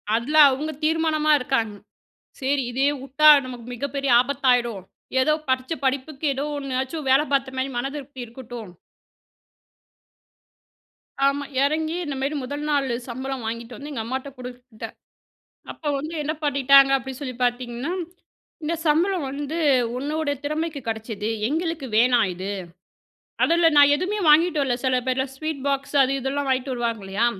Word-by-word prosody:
அதுல 265 +7 0
அவங்க 300 +4 -3
தீர்மானமா 315 -1 +2
இருக்காங்க. 240 -5 -1 0.7
சரி 270 0 0
இதே 270 +3 +1
வுட்டா 275 +3 +4 0.2
நமக்கு 245 -2 -8
மிகப்பெரிய 275 +2 -3
ஆபத்தாயிடும். 245 -6 +1 0.4
ஏதோ 305 +3 +3 0.2
படிச்ச 260 +4 0
படிப்புக்கு 275 +3 -2
ஏதோ 275 +2 -3
ஒண்ணாச்சும் 270 +2 -3
வேலை 270 +3 +5
பார்த்த 270 -1 0
மாதிரி 265 +1 -1
மனதிருப்தி 275 +1 -5
இருக்கட்டும். 235 -4 -9 2.5
ஆமா, 280 +1 +1 0.2
இறங்கி 315 +3 0
இந்தமாரி 280 0 -2
முதல் 285 +3 -5
நாள் 280 -2 +1 0.2
சம்பளம் 260 +1 -5
வாங்கிட்டு 230 +2 -5
வந்து 290 +1 -8
எங்க 270 - -3
அம்மாட்ட 260 +3 -4
குடுத்தேன். 245 -2 -9 0.8
அப்போ 305 - -8
வந்து 310 +4 -6
என்ன 305 +2 -1
பண்ணிட்டாங்க 275 -1 +5
அப்படின்னு 265 0 -8
சொல்லி 255 -3 -5
பார்த்தீங்கன்னா, 245 +4 -2 0.7
இந்த 315 +2 -1
சம்பளம் 335 +2 +2
வந்து 290 +3 -4 0.4
உன்னோட 300 +3 -2
திறமைக்கு 305 +1 -2
கிடைச்சது. 220 -1 -3 0.2
எங்களுக்கு 320 -2 -2
வேணாம் 240 -3 +4
இது. 190 +3 -4 0.9
அதுல 335 0 +4
நான் 285 0 +7
எதுவுமே 380 +6 -2
வாங்கிட்டு 310 0 +4
வரல. 250 -3 0
சில 255 -1 +2
பேர்லாம் 260 +1 -1
ஸ்வீட் 310 -2 -4
பாக்ஸ் 275 +1 -2
அது 265 +1 +1
இதெல்லாம் 275 +2 -2
வாங்கிட்டு 260 0 0
வருவாங்க 230 -3 -2
இல்லையா. 195 +5 0
270 Hz, 135 wpm, -23 LUFS, 250-295 Hz, 2.5 s, நான்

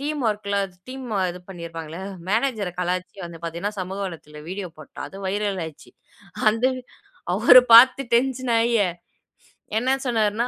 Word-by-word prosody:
Team 295 0 -3
வொர்க்ல 205 -2 -1 0.2
ச் 180 - -27
டீம்ம 255 -5 -4
இது 180 +1 -9
பண்ணிருப்பாங்க 165 -3 -7
இல்லையா. 180 +4 -6 0.2
மேனேஜர 220 -2 0
கலாய்ச்சு 180 +2 -3
வந்து 170 -1 -9
பாத்தீங்கன்னா, 170 +5 -3
சமூக 185 +2 -5
வளையத்துல 155 -4 -10
வீடியோ 190 0 -5
போட்டா. 155 - -12
அது 190 - -12
வைரல் 200 0 -1
ஆயிருச்சு. 160 -2 -11 0.6
அந்த 225 +3 -2
வ், - - -6 0.5
அவரு 235 +5 +8
பாத்து 255 +3 +8
டென்ஷன் 255 0 +1
ஆயி, 235 +1 +2 1.0
என்ன 260 +4 +2
சொன்னாருன்னா, 225 -1 +1
205 Hz, 150 wpm, -23 LUFS, 180-240 Hz, 1.0 s, அவரு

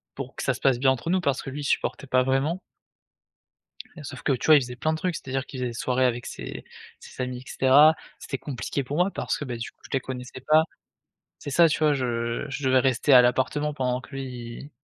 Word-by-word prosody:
pour 130 -1 -7
que - - -5
ça 135 - +1
se 125 - -8
passe 130 -3 +2
bien 130 0 +4
entre 130 +6 -3
nous 185 +1 +2
parce 140 -5 0
que - - -7
lui, 145 +2 -6
il - - -5
supportait 140 0 -1
pas 130 0 +3
vraiment 135 +7 0 1.4
et 155 - -9
sauf - - -8
que - - +1
tu 125 - -2
vois, 155 -1 +8
il - - +5
faisait 125 0 -7
plein 155 +6 0
de 160 - -2
trucs. 180 +1 -1
C'est-à-dire 135 0 -4
qu'il 135 - -9
faisait 125 - -1
des - - -7
soirées 130 +2 0
avec 120 0 -2
ses - - -7 0.4
ses 130 - -7
amis, 125 0 -4
et 125 - -12
cetera. 145 +4 +6 0.2
C'était 135 - -5
compliqué 140 +1 -4
pour 145 +3 -4
moi 180 +4 +2
parce - - -2
que, - - -4
beh, 125 -3 -4
du 115 - -5
coup, - - -47
je - - -13
les 135 - +1
connaissais 125 0 -7
pas. 155 +1 +6 0.7
C'est 145 - -7
ça, 165 +4 +6
tu 155 - 0
vois? 150 -1 +4
Je 120 -1 -2
je 140 +1 -5
devais 130 0 +5
rester 135 +2 +2
à 125 - +10
l'appartement 145 +4 +1
pendant 125 -2 -1
que - - -15
lui, 135 0 -4 0.3
il 145 - -10
135 Hz, 255 wpm, -25 LUFS, 125-145 Hz, 1.4 s, à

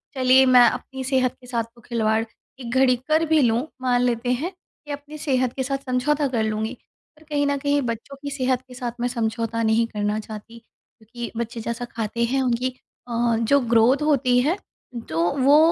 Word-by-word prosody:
चलिए 260 0 +5
मैं 250 -2 +7
अपनी 265 -1 -6
सेहत 260 -1 +1
के 250 - -14
साथ 235 -2 -1
तो 235 - -18
खिलवाड़ 220 -1 0 0.4
एक 240 - -7
घड़ी 260 -1 +5
कर 315 +1 +3
भी 315 -1 +3
लूँ, 240 +3 +2
मान 245 -1 +2
लेते 245 0 0
हैं। 305 +9 -2 0.4
अपनी 290 +2 -8
सेहत 260 -5 0
के 265 - -2
साथ 275 +1 -1
समझौता 280 +3 +1
कर 235 -4 0
लूँगी 220 +2 -2 0.4
पर 310 - -19
कहीं 290 -1 +1
न 285 0 +1
कहीं 285 +1 +1
बच्चों 235 +3 -5
की 285 - -4
सेहत 255 -2 0
के 255 - -12
साथ 245 -1 -4
मैं 245 - +1
समझौता 230 -1 -2
नहीं 220 +1 +3
करना 210 -1 -2
चाहती 220 +2 -9
क्योंकि 230 +1 -11
बच्चे 235 0 -4
जैसा 235 +2 -4
खाते 235 0 -3
हैं 265 +3 0
उनकी 250 0 0 0.4
अ, 235 0 +1
जो 260 +5 +3
ग्रोथ 235 +5 +5
होती 265 -5 +3
है 315 +9 +1 0.5
तो 165 +2 +1
वो 275 +3 +6
250 Hz, 190 wpm, -23 LUFS, 230-270 Hz, 0.5 s, मैं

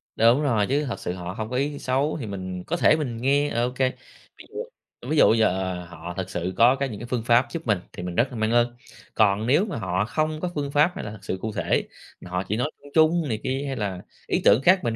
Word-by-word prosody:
Đúng 115 +5 +4
rồi, 115 -8 +2
chứ 145 +2 +1
thật 120 - -4
sự 90 - -3
họ 90 0 -6
hông 110 +1 -5
có 125 - -4
ý 140 +2 -1
xấu, 135 +5 0
thì 130 - -4
mình 95 -2 -5
có 175 - -1
thể - - +5
mình 135 -7 -3
nghe, 140 +4 +2
ờ, 120 +1 0
OK. 125 +1 -3 0.6
Ví - - -13
dụ 465 - -5 0.5
ví 155 - +1
dụ 110 - +6
giờ 95 -4 +1 0.2
họ 85 0 -8
thật 95 - -3
sự 90 +2 -3
có 120 +3 +6
cái 140 0 -2
những 105 -4 -7
cái - - -6
phương 120 -2 -2
pháp 120 +2 +4
giúp 165 -5 -6
mình 105 -4 +2
thì - - -7
mình 90 -1 -5
rất 120 +7 +3
là 125 - -7
mang 110 0 0
ơn. 120 0 +2 0.4
Còn 105 +1 +2
nếu 150 +10 +4
mà 205 - -5
họ 95 -2 -1
không 155 +5 -1
có 180 - -2
phương 140 -1 -2
pháp 150 +5 +4
hay - - -5
là 105 - -5
thực 105 -3 -12
sự 95 - -3
cụ 110 - -3
thể, - - 0 0.3
mà - - -10
họ 90 +1 -1
chỉ 105 - -1
nói 135 +6 -1
chung 145 - -13
chung 160 0 +4
này 110 -2 -1
kia, 135 +2 -1
hay 135 - -3
là 100 -6 -3 0.3
ý - - 0
tưởng 125 - +6
khác 185 +5 +5
mình 115 -1 -1
120 Hz, 275 wpm, -24 LUFS, 100-145 Hz, 0.6 s, dụ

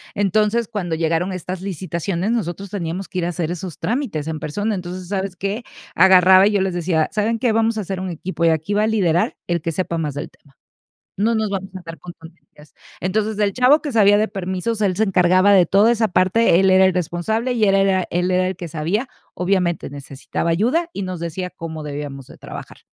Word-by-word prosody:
entonces, 210 +3 +1
cuando 185 -7 -3
llegaron 165 +3 0
estas 185 0 -5
licitaciones, 185 +1 -3
nosotros 200 -3 -3
teníamos 180 -1 -4
que 185 - -4
ir 170 - -1
a - - -1
hacer 170 -1 -3
esos 175 -1 -6
trámites 220 - -2
en 160 -1 -3
persona, 205 +10 -2
entonces, 180 -1 -6
¿sabes 195 -2 -3
qué? 200 +5 -3 0.3
Agarraba 185 +1 +6
y - - +2
yo 200 -2 +1
les 190 -1 -1
decía: 170 -2 0
"¿Saben 220 +2 0
qué? 235 0 +1
Vamos 225 0 +1
a - - -1
hacer 190 -1 -4
un 185 0 -4
equipo 170 +1 -5
y - - +5
aquí 160 +5 -1
va 210 +1 +2
a - - +2
liderar 180 -6 +1
el 175 -1 -1
que 165 +1 -2
sepa 170 0 -2
más 150 -3 -3
del 145 - -5
tema, 140 -2 -27 0.6
no 225 +4 +1
nos 220 -1 0
vamos 195 -1 -5
a - - -3
andar 165 -2 -9
con 175 - -9
tonterías". 165 -2 -17 0.3
Entonces, 210 +3 -1
el 205 -2 +1
chavo 255 +5 +4
que 290 -4 -5
sabía 205 -2 +5
de 215 +1 +2
permisos, 195 +3 -3
él 190 -3 +1
se 220 - +3
encargaba 185 +1 +4
de 185 -3 +6
toda 200 +7 +4
esa 225 -2 0
parte, 185 +1 +3
él 190 0 +4
era 190 0 +6
el 190 - +3
responsable, 180 +8 -1
y 230 -3 0
él 195 -2 +4
era 195 -1 +2
él 180 +1 0
era 185 0 +2
el 185 -1 -4
que 175 - -6
sabía, 165 - -2 0.3
obviamente 180 -2 0
necesitaba 140 +3 -5
ayuda 245 - +1
y 200 - -5
nos 185 -2 -5
decía 175 +2 -4
cómo 160 -3 -7
debíamos 145 -2 -6
de - - -14
trabajar. - - -10
185 Hz, 220 wpm, -20 LUFS, 170-205 Hz, 0.6 s, Agarraba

